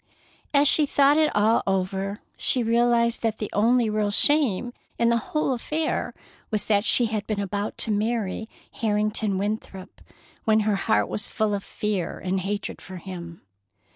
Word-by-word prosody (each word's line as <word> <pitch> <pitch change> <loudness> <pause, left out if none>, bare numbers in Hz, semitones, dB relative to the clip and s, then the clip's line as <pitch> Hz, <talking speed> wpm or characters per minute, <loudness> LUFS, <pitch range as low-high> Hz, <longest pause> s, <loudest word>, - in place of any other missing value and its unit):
As 290 0 +4
she 300 +1 +4
thought 285 +2 +4
it 310 -1 +3
all 215 +2 +3
over, 195 +1 -1
she 250 - +1
realized 235 0 +2
that 225 -2 -1
the 210 - -5
only 235 +3 +3
real 215 -1 0
shame 245 -1 +2 0.2
in 235 0 +3
the 235 - +3
whole 305 -3 0
affair 305 +6 -2 0.3
was 210 -2 0
that 205 -2 +2
she 240 - +4
had 215 -2 -3
been 215 -2 -2
about 200 +1 -3
to 225 - +1
marry 220 0 -1 0.3
Harrington 210 -2 0
Winthrop 200 -2 -5 0.4
when 220 0 +3
her 210 -1 +1
heart 220 +3 +1
was 210 - -3
full 215 -1 -1
of 200 -1 -2
fear 205 -5 -3
and 190 +1 -2
hatred 200 +2 -4
for 190 - -10
him. 170 -2 -8
215 Hz, 165 wpm, -25 LUFS, 200-235 Hz, 0.4 s, As